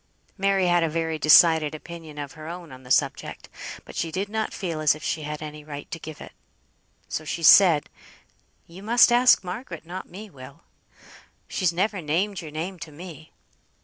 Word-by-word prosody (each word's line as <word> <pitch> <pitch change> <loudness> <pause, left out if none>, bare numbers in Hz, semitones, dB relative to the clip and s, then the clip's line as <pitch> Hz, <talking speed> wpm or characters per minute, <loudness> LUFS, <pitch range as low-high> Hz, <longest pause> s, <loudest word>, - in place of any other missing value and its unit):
Mary 195 -1 +1
had 175 -1 +3
a 165 - +1
very 160 0 -2
decided 155 0 +6
opinion 160 -1 -10
of 145 -2 -6
her 155 -1 -10
own 170 -2 -8
on 130 0 -11
the 125 - -15
subject, - - 0 0.4
but - - -12
she 165 - -2
did 195 +4 -3
not 220 0 -2
feel 170 -5 -4
as 155 -1 +4
if 155 - -12
she 160 - -2
had 150 0 -5
any 150 0 -8
right 145 -1 -9
to 165 - -5
give 155 -1 -9
it. - - -10 0.8
So 155 - -4
she 165 +2 -4
said 165 -4 +7 0.8
"You 175 +3 -13
must 235 +4 +5
ask 245 -3 +5
Margaret, 180 -2 -7
not 180 +3 -7
me, 205 +5 -9
Will; 130 -9 -14 0.8
she's 185 -3 0
never 190 +3 -1
named 180 +6 -1
your 160 - -8
name 170 +5 -5
to 165 - -8
me." 160 0 -11
165 Hz, 185 wpm, -25 LUFS, 155-185 Hz, 0.8 s, said